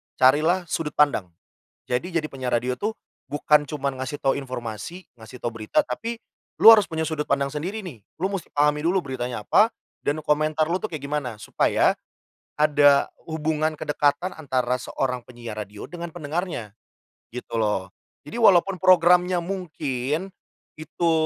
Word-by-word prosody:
carilah 155 +8 +4
sudut 150 -2 -2
pandang. 145 -10 +3 0.6
Jadi, 125 +8 0
jadi 155 -2 +1
penyiar 130 -2 -2
radio 125 +2 -1
tuh, 215 +2 -2 0.3
bukan 150 0 +2
cuman 140 -3 -3
ngasih 130 +3 -4
tahu 135 - +2
informasi 130 - -7
ngasih 110 +3 -11
tahu 120 - -3
berita 110 - 0
tapi 230 0 -4 0.4
lu - - +6
harus 215 -2 +7
punya 160 0 -2
sudut 155 -2 -3
pandang 140 0 0
sendiri 185 +9 -4
nih, 150 - -8 0.2
lu 195 - +1
mesti 195 -4 -4
pahami 150 +1 +3
dulu 185 0 +2
beritanya 125 -5 -4
apa, 210 - +5 0.4
dan 145 +2 0
komentar 155 +1 +1
lu 180 +2 0
tuh 215 - -3
kayak 155 -4 -6
gimana, 140 -5 -3
supaya, - - +2 0.7
ada 145 -2 +4 0.2
hubungan 155 0 -1
kedekatan 150 +5 0
antara 125 -5 -1
seorang 125 -2 -2
penyiar 120 -3 -8
radio 105 0 -8
dengan 170 -1 -6
pendengarnya, 155 - -4 0.6
gitu 125 -1 -5
loh. 105 -4 0 0.3
Jadi 235 - -8
walaupun 195 -4 +5
programnya 180 0 +5
mungkin, 160 -3 -3 0.5
itu 165 +2 -1
150 Hz, 150 wpm, -24 LUFS, 130-175 Hz, 0.7 s, harus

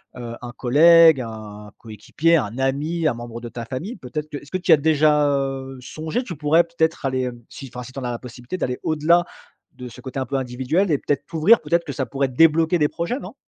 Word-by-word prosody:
heu, 120 -2 -7
un 120 - -7
collègue, 160 +3 +6
un 105 -2 -9
coéquipier, 135 - 0
un 115 -3 -3
ami, 150 +5 -1
un 150 - +1
membre 120 0 -8
de 120 - -7
ta 115 0 -7
famille, 160 - -6
peut-être 150 +1 -6
que 145 - -5
est-ce 145 - -13
que 185 - 0
t'y 180 -1 0
as 160 - +8
déjà, 150 0 +3
heu, 135 -1 -2
songé? 160 - -4
Tu 180 - -7
pourrais 155 +3 +3
peut-être 165 -3 -1
aller, 130 -1 0
hem, 120 -2 -6
si 135 - -9
enfin, 125 - -6
si 125 - -11
tu 135 - -7
en - - -7
as 125 - -2
la 120 - -5
possibilité, 125 +6 -8
d'aller 125 -7 -3
au-delà 160 +3 +2 0.5
de 125 -1 -8
ce - - -12
côté 130 0 -6
un 130 - -2
peu 140 - -5
individuel 130 +8 -1
et 145 - +3
peut-être 140 0 -2
t'ouvrir, 165 +8 +4
peut-être 170 0 0
que 140 - -5
ça 130 0 -2
pourrait 135 0 -1
débloquer 160 +5 +3
des 150 - +3
projets, 170 +10 -3
non? - - -9
140 Hz, 235 wpm, -22 LUFS, 125-160 Hz, 0.5 s, as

